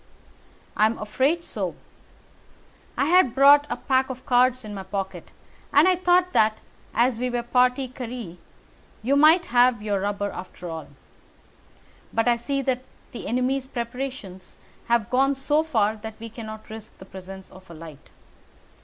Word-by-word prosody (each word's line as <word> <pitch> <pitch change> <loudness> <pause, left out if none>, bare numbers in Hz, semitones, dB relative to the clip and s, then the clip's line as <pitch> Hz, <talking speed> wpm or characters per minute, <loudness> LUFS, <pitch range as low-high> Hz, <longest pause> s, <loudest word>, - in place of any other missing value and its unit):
"I 215 - +4
am 225 - -3
afraid 270 +11 0
so. - - -4 1.2
I - - +2
had 345 -6 +4
brought 285 +2 +7
a - - -2
pack 260 -1 +1
of 260 0 -7
cards 255 0 +3
in 210 - -7
my 195 - -5
pocket, 195 0 -5 0.4
and 290 +5 +5
I 370 - +4
thought 360 0 +2
that, 215 0 +3 0.3
as 235 0 +1
we 250 0 -1
were 245 - -2
a 240 - -27
partie 250 +1 +3
carrée, 240 -8 -7 0.7
you 265 +5 +2
might 315 +5 +6
have 245 -3 +4
your 205 -2 0
rubber 205 0 -2
after 180 -1 -9
all. 160 -1 -7 1.2
But 225 +1 0
I 240 - +4
see 275 +3 -2
that 255 -1 -1 0.3
the 240 - -7
enemy's 255 +3 0
preparations 240 -6 -6 0.3
have 235 -2 +1
gone 270 +2 +3
so 295 +3 +1
far 220 -9 0
that 220 +1 -9
we 230 0 -8
cannot 220 -1 -9
risk 220 0 -10
the 190 - -12
presence 190 0 -11
of 185 -1 -16
a 170 - -10
light. 155 -3 -12
245 Hz, 160 wpm, -24 LUFS, 210-270 Hz, 1.2 s, brought